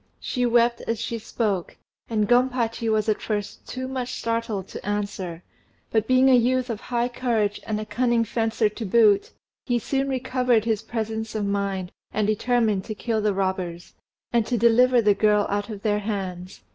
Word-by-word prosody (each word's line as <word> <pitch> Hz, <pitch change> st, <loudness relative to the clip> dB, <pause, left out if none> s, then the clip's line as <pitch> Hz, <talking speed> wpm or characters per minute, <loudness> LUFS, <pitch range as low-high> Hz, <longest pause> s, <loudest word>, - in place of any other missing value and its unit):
She 250 Hz, -1 st, -1 dB
wept 235 Hz, 0 st, +3 dB
as 230 Hz, -1 st, -1 dB
she 230 Hz, -, -3 dB
spoke, 205 Hz, -5 st, -2 dB, 0.3 s
and 215 Hz, -2 st, +1 dB
Gompachi 245 Hz, -2 st, +1 dB
was 215 Hz, 0 st, +1 dB
at 215 Hz, -, +1 dB
first 205 Hz, -2 st, -4 dB
too 255 Hz, 0 st, -4 dB
much 255 Hz, -1 st, -4 dB
startled 230 Hz, -4 st, -2 dB
to -, -, -8 dB
answer; 200 Hz, -4 st, -3 dB, 0.5 s
but 220 Hz, -1 st, +1 dB
being 255 Hz, +1 st, +5 dB
a 265 Hz, -, +6 dB
youth 250 Hz, +1 st, +2 dB
of 215 Hz, -, -4 dB
high 240 Hz, -1 st, -1 dB
courage 230 Hz, -4 st, -1 dB
and 215 Hz, -1 st, -1 dB
a 215 Hz, -, -4 dB
cunning 235 Hz, +2 st, +1 dB
fencer 225 Hz, 0 st, 0 dB
to 210 Hz, +2 st, -6 dB
boot, 210 Hz, -1 st, +4 dB, 0.4 s
he 245 Hz, -2 st, +2 dB
soon 270 Hz, +4 st, -1 dB
recovered 250 Hz, -3 st, +1 dB
his 220 Hz, -2 st, 0 dB
presence 220 Hz, -1 st, -4 dB
of 210 Hz, -1 st, -1 dB
mind, 200 Hz, -2 st, -2 dB, 0.2 s
and 215 Hz, 0 st, 0 dB
determined 215 Hz, -2 st, +1 dB
to 215 Hz, -, -5 dB
kill 225 Hz, 0 st, -1 dB
the 210 Hz, -2 st, +1 dB
robbers, 185 Hz, -3 st, -3 dB, 0.4 s
and 235 Hz, -2 st, +2 dB
to 245 Hz, -, 0 dB
deliver 235 Hz, +2 st, +5 dB
the 205 Hz, -1 st, +5 dB
girl 210 Hz, 0 st, +3 dB
out 205 Hz, +2 st, -1 dB
of 205 Hz, -2 st, -7 dB
their 210 Hz, -1 st, +1 dB
hands. 190 Hz, -4 st, -5 dB
220 Hz, 180 wpm, -24 LUFS, 205-240 Hz, 0.5 s, a